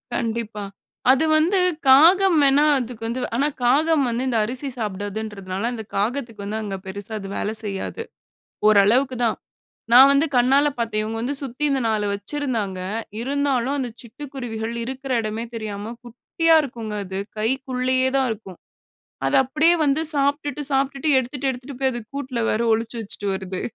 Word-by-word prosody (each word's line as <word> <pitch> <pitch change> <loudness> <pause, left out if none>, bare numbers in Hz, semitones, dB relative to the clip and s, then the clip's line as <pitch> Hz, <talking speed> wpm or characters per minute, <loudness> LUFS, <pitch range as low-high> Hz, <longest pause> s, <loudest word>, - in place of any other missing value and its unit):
கண்டிப்பா. 225 -3 -3 0.5
அது 270 +4 +3
வந்து 355 +5 +3 0.3
காகம் 340 +7 +6
வேணா 280 +2 +5
அதுக்கு 240 -2 -5
வந்து 245 +2 -3
ஆனா 280 +4 +2 0.2
காகம் 295 +4 +3
வந்து 240 +2 -1
இந்த 240 - +1
அரிசி 260 +4 -4
சாப்பிடாதுன்றதுனால, 205 -1 -4
அந்த 220 - -6
காகத்துக்கு 225 0 -2
வந்து 215 +2 -3
அங்க 195 -2 -4
பெருசா 200 +3 -8
அது 195 - -7
வேல 210 - -1
செய்யாது. 205 - -4 0.6
ஓரளவுக்கு 225 +6 +4
தான். 225 - 0 0.6
நான் 265 +3 +9
வந்து 280 +3 +4
கண்ணால 270 +4 +4
பார்த்தேன். 225 -2 -1
இவங்க 225 +1 -4
வந்து 275 +5 -2
சுத்தி 270 +2 -5
இந்த 275 - +1
4 215 -1 0
வச்சிருந்தாங்க 210 -3 -3 0.4
இருந்தாலும் 275 0 0
அந்த 255 -3 -2
சிட்டுக்குருவிகள் 235 -3 -6
இருக்கிற 265 +2 -6
இடமே 215 +1 -3
தெரியாம 215 0 -5
குட்டியா 320 +7 +1
இருக்குங்க 230 -5 -6
அது, 190 +1 -5 0.2
கைக்குள்ளேயே 255 +2 0
தான் 265 -1 +2
இருக்கும். 195 -5 -8 0.7
அத - - 0
அப்டியே 310 +6 +3
வந்து 280 +2 +2
சாப்பிட்டுட்டு 285 0 0
சாப்பிட்டுட்டு 275 +2 0
எடுத்துட்டு 260 +2 -2
எடுத்துட்டு 255 +1 -8
போய் 265 -1 +2
அது 240 - -4
கூட்ல 260 -3 -4
வேற 215 - 0
ஒழிச்சு 225 +2 -1
வச்சுட்டு 205 -1 -5
வருது. 190 -1 -5
245 Hz, 150 wpm, -22 LUFS, 215-275 Hz, 0.7 s, நான்